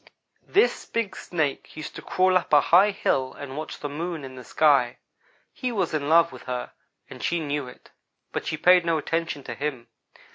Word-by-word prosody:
"This 420 +5 +2
big 215 -5 -2
Snake 155 -5 -3
used 155 - -6
to - - -7
crawl 185 0 +2
up 185 - +1
a 145 - +9
high 180 +7 +5
hill 130 -9 0
and 140 -2 -8
watch 155 +1 -6
the 145 - -2
Moon 160 +2 -4
in 130 -1 -8
the 130 -1 -10
sky. 135 -4 +3 0.6
He 255 -2 -3
was 190 -8 -1
in 145 -1 -1
love 170 +1 +5
with - - -12
her, 125 -1 -4 0.4
and - - -11
she 170 - 0
knew 145 -3 -2
it; 125 - -14 0.4
but - - -4
she 155 - -2
paid 180 +2 +6
no 165 -1 +1
attention 165 -1 -2
to 120 - -6
him. 130 -3 -4
155 Hz, 195 wpm, -25 LUFS, 140-175 Hz, 0.6 s, a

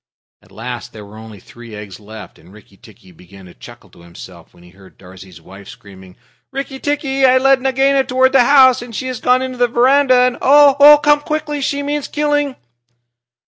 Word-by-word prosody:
At - - -26
last 120 +2 -9
there 105 -2 -12
were 100 +1 -16
only 110 -2 -13
three 120 +2 -15
eggs 105 -3 -11
left, 110 +1 -14
and 90 - -21
Rikki 105 -1 -20
tikki 100 -2 -20
began 90 +3 -18
to 90 - -16
chuckle - - -17
to - - -20
himself, 85 0 -15
when 85 - -22
he 90 - -19
heard 95 0 -21
Darzee's 95 -1 -16
wife 95 +4 -16
screaming: 95 -2 -16 0.3
"Rikki 270 0 -8
tikki, 275 -2 -3
I 260 -1 +4
led 270 0 +1
Nagaina 270 +1 0
toward 260 0 0
the 265 -3 +3
house, 260 -2 +4
and 240 -2 -11
she 260 - -6
has 255 -2 -7
gone 255 +1 +1
into 255 -1 -8
the 245 - +2
veranda, 255 +3 +2
and 250 -1 -1
oh, 290 +1 +5
come 295 0 +3
quickly 300 -1 -5
she 285 +1 -3
means 290 0 -4
killing!" 290 -2 -2
250 Hz, 195 wpm, -15 LUFS, -, 0.3 s, oh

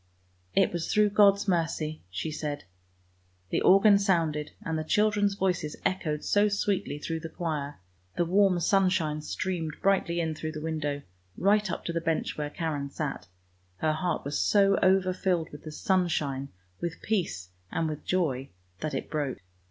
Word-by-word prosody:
" 90 0 -38
" - - -39
It 195 - +3
was 170 -1 -2
through 210 -1 +4
God's 205 0 +5
mercy! 165 -3 -1
" - - -37
she 95 - -4
said. 150 -1 -4 0.9
The - - +1
organ 200 +2 +6
sounded, 165 -6 +1
and 165 -6 -2
the 155 - -1
children's 205 +3 +2
voices 180 -6 -1
echoed 155 -5 -1
so 205 +1 +3
sweetly 200 -5 -1
through 165 +2 -3
the 165 0 -7
choir. 150 -4 -3 0.4
The 175 - +1
warm 190 0 +3
sunshine 175 -6 +2
streamed 165 -1 -3
brightly 190 -3 +2
in 160 -2 0
through 155 0 -5
the 155 - -5
window, 150 -3 -2 0.3
right 205 +2 +3
up - - -4
to 170 - -2
the 165 - -1
bench 165 -1 -1
where 150 -1 -3
Karen 145 -3 -3
sat; 140 0 -4 0.5
her 155 +9 +1
heart 165 -1 -2
was 145 +1 -2
so 200 -1 +4
over 185 0 +4
filled 180 -3 0
with 145 +1 -11
the 155 - -6
sunshine, 150 -7 0 0.3
with 170 -1 -5
peace, 175 - -1 0.2
and 165 - 0
with 155 -1 -5
joy, 140 -8 0 0.3
that 155 0 -3
it - - -3
broke. 145 -4 -2
165 Hz, 175 wpm, -28 LUFS, 150-190 Hz, 0.9 s, organ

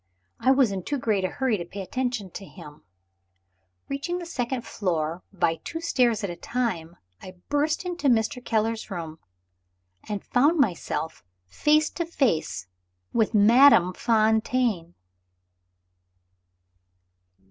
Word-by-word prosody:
I - - +2
was 265 -5 +4
in 195 -1 -3
too 285 +10 -3
great 215 -6 0
a - - +2
hurry 240 +1 -1
to - - -3
pay 195 +4 -8
any 190 - -8
attention 245 -7 -3
to 195 - -8
him. 165 -6 -13 1.1
Reaching 285 +6 -3
the 355 - -6
second 250 -6 -3
floor 170 -3 -2
by 165 -4 0
two 325 - -5
stairs 245 -9 +1
at 200 - -1
a - - -6
time, 180 -8 -3 0.2
I 185 0 -10
burst 300 +4 0
into 355 -4 -2
Mr. 245 +2 +1
Keller's 225 -1 0
bedroom, 165 -5 -7 0.9
and 205 -2 -4
found 290 +7 +3
myself 175 - -1 0.2
face 300 - +2
to 340 - -3
face 220 - 0 0.5
with 225 -1 +1
Madame 210 -3 +6
Fontaine! 220 -5 +1
225 Hz, 130 wpm, -25 LUFS, 185-265 Hz, 1.1 s, Madame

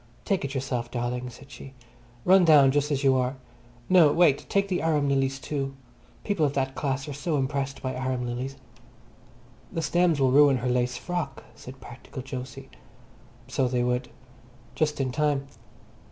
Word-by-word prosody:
"Take 195 -7 0
it 140 0 -4
yourself, 125 -3 -2
darling," 125 +1 -3
said 135 +3 -14
she. 135 0 -11 0.5
"Run 190 0 +6
down 145 -5 +6
just 145 +1 +1
as 145 -1 -1
you 135 -1 +4
are. 125 +1 0 0.5
No, 175 -5 +6
wait, 155 -4 +3
take 200 0 +1
the 185 -2 -1
arum 150 -3 +1
lilies 135 -1 +1
too. 135 -1 -4 0.5
People 200 -6 0
of 145 -2 +2
that 135 -1 -1
class 135 -1 -2
are 145 - -5
so 150 +3 -2
impressed 135 -1 -2
by 130 0 -2
arum 130 -1 -2
lilies." 125 +3 -4 1.2
"The 165 -3 -3
stems 175 -3 +2
will 130 -2 +3
ruin 140 -1 +6
her 125 +1 -2
lace 125 0 0
frock," 155 -1 -4
said 130 +1 -12
practical 125 +1 -9
Jose. 130 +1 -7 0.8
So 130 0 0
they 125 0 0
would. 125 0 -1 0.6
Just 150 +2 -1
in 130 -2 0
time. 145 0 0
135 Hz, 170 wpm, -26 LUFS, 130-150 Hz, 1.2 s, Run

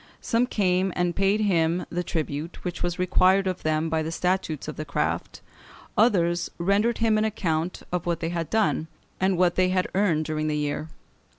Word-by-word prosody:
Some 240 +1 +1
came 190 -4 +1
and 175 -1 0
paid 195 +2 +2
him 175 -4 +1
the 175 +1 -1
tribute 160 0 -4
which 180 -1 -4
was 175 0 -1
required 185 +1 +3
of 185 -1 -2
them 155 +1 0
by 160 0 0
the 160 +1 -3
statutes 180 -4 -1
of 155 - -5
the 155 - -4
craft; 145 - -2 0.5
others 175 -6 +2
rendered 200 +6 +2
him 220 -2 +2
an - - +1
account 180 -6 -1
of 180 -1 -2
what 170 -2 0
they 165 - -2
had 170 -2 -3
done, 215 -7 +1 0.3
and 190 -1 +2
what 175 -1 +3
they 185 0 +2
had 185 0 +1
earned 175 -6 +2
during 155 0 -2
the 150 -1 0
year. 150 +1 -2
175 Hz, 190 wpm, -25 LUFS, 160-195 Hz, 0.5 s, required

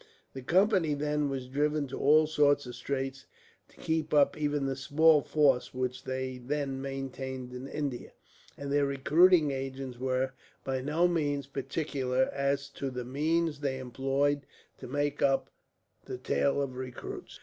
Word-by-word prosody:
The 130 - -6
Company, 180 - +3
then, 150 0 0
were 135 -1 -2
driven 145 +3 0
to 135 - -5
all 155 +2 +5
sorts 145 -2 +3
of 125 - -7
straits 135 +2 -4 0.4
to - - -24
keep 160 -1 -1
up 145 -1 +5
even 145 -2 -1
the 135 0 -1
small 150 +3 +4
force 135 -4 +2
which 125 0 -3
they 130 -1 -3
then 135 +1 -2
maintained 130 -2 -5
in 125 +2 -6
India, 140 -4 -4 0.4
and 140 0 -5
their 145 -1 +3
recruiting 150 +3 +4
agents 135 -2 -5
were, 130 0 0 0.3
by 130 -1 -2
no 155 +6 +2
means, 145 -5 0
particular 135 -2 -1
as 140 0 0
to 140 -1 -4
the 125 -1 -5
means 155 +4 0
they 140 -2 -1
employed 135 +2 0 0.3
to - - -8
make 145 +2 -1
up 135 -1 +2 0.5
the - - -5
tale 70 - +1
of 130 -2 -5
recruits. 130 -1 -7
140 Hz, 155 wpm, -30 LUFS, 130-150 Hz, 0.5 s, all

